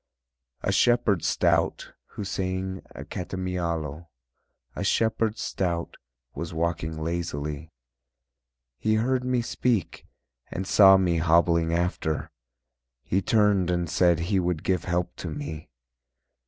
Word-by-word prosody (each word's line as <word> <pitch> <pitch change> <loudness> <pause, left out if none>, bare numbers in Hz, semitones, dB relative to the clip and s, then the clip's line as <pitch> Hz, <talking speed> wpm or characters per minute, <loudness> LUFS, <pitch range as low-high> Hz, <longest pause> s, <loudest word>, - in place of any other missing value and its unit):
A - - +1
shepherd 120 -7 +3
stout - - +1 0.2
Who - - -4
sang 95 0 -3
a - - -7
catamiaulo, 85 -4 -4 0.7
A - - -3
shepherd 110 -1 +1
stout 85 -3 -2 0.4
Was 85 -1 -6
walking 80 -1 -2
lazily. 80 -2 -4 1.1
He 110 0 +2
heard 125 +3 +1
me 125 -1 0
speak 115 -6 -1 0.4
And 95 - -4
saw 95 0 +7
me 90 -3 +1
hobbling 85 0 +3
after, 85 -2 -1 0.7
He 95 - 0
turned 105 -4 +3
and 85 -1 0
said 85 +1 +3
He 95 +3 +1
would 90 -3 -1
give 95 -2 0
help 90 0 -1
to 85 - -5
me. 75 +1 -6
90 Hz, 115 wpm, -26 LUFS, 85-95 Hz, 1.1 s, saw